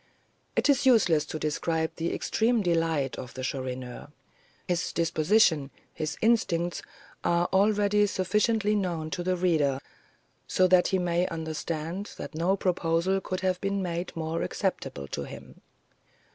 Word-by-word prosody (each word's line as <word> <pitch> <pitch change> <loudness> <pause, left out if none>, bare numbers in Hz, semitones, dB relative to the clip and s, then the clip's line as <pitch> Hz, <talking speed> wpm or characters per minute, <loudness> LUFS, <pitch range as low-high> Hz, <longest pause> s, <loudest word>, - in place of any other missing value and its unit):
It - - +2
is 275 -2 +3
useless 175 - +4
to 155 - -5
describe 160 +1 -1
the 170 +1 -1
extreme 230 -1 +1
delight 165 -6 0
of 125 - -8
the 130 - -5
Chourineur. 130 -1 -4 0.6
His 175 -1 -1
disposition, 160 -2 +3 0.2
his 155 -1 -4
instincts, 175 -7 +2 0.4
are 175 0 +2
already 205 +1 +3
sufficiently 210 +3 +1
known 170 -6 -1
to 165 - -2
the 185 +1 0
reader, 155 -7 +2 0.7
so 185 - +3
that 180 -1 +5
he 190 - +1
may 175 0 +1
understand 160 +3 -4
that - - -7
no 175 +5 +1
proposal 180 +1 +1
could 185 0 -4
have 185 -1 0
been 195 0 -1
made 175 0 -3
more 165 0 -2
acceptable 70 -1 -3
to - - -4
him. - - -11
175 Hz, 140 wpm, -28 LUFS, 160-195 Hz, 0.7 s, that